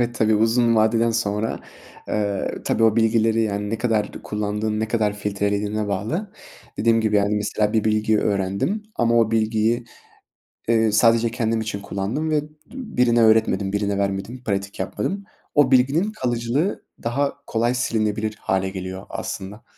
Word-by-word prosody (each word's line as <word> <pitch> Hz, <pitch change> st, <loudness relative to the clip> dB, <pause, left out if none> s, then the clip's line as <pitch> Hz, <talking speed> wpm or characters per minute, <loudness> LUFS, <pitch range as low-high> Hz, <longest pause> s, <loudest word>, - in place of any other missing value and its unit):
Evet, 120 Hz, 0 st, 0 dB
tabii. 110 Hz, -1 st, +2 dB
Uzun 115 Hz, +2 st, +3 dB
vadeden 115 Hz, +1 st, +3 dB
sonra, 110 Hz, -1 st, -1 dB, 0.5 s
eee, 100 Hz, -2 st, -1 dB
tabii, 115 Hz, -, 0 dB
o 110 Hz, -1 st, +4 dB
bilgileri, 115 Hz, 0 st, +3 dB
yani, 105 Hz, -1 st, -2 dB
ne 115 Hz, -, -2 dB
kadar 110 Hz, -4 st, 0 dB
kullandığın 105 Hz, +1 st, -2 dB
ne 110 Hz, -, -1 dB
kadar 110 Hz, -3 st, +1 dB
filtrelediğine 105 Hz, +1 st, -1 dB
bağlı. 155 Hz, -, -3 dB, 0.5 s
Dediğim 115 Hz, 0 st, +3 dB
gibi, 110 Hz, -1 st, +2 dB
yani, 100 Hz, +1 st, +2 dB
mesela 105 Hz, 0 st, 0 dB
bir 110 Hz, -2 st, +1 dB
bilgiyi 110 Hz, 0 st, +2 dB
öğrendim 100 Hz, -, -1 dB
ama 115 Hz, -1 st, +2 dB
o 115 Hz, -1 st, +3 dB
bilgiyi, 110 Hz, +1 st, +1 dB, 0.8 s
eee, 115 Hz, -1 st, +3 dB
sadece 115 Hz, +1 st, +4 dB
kendim 115 Hz, -1 st, 0 dB
için 110 Hz, -2 st, -4 dB
kullandım 100 Hz, +11 st, -3 dB
ve 155 Hz, -1 st, +2 dB
d -, -, -11 dB, 0.2 s
birine 125 Hz, -, +1 dB
öğretmedim, 110 Hz, -3 st, +3 dB
birine 100 Hz, -1 st, 0 dB
vermedim, 100 Hz, +5 st, -3 dB
pratik 100 Hz, -1 st, -3 dB
yapmadım. 195 Hz, -, -3 dB, 0.3 s
O 145 Hz, -3 st, +4 dB
bilginin 140 Hz, +11 st, +3 dB
kalıcılığı 125 Hz, -, -1 dB, 0.2 s
daha 140 Hz, +5 st, 0 dB
kolay 120 Hz, +2 st, +1 dB
silinebilir 110 Hz, -3 st, -1 dB
hâle 95 Hz, 0 st, 0 dB
geliyor 95 Hz, 0 st, -6 dB
aslında. 100 Hz, +4 st, -6 dB
110 Hz, 150 wpm, -22 LUFS, 105-120 Hz, 0.8 s, o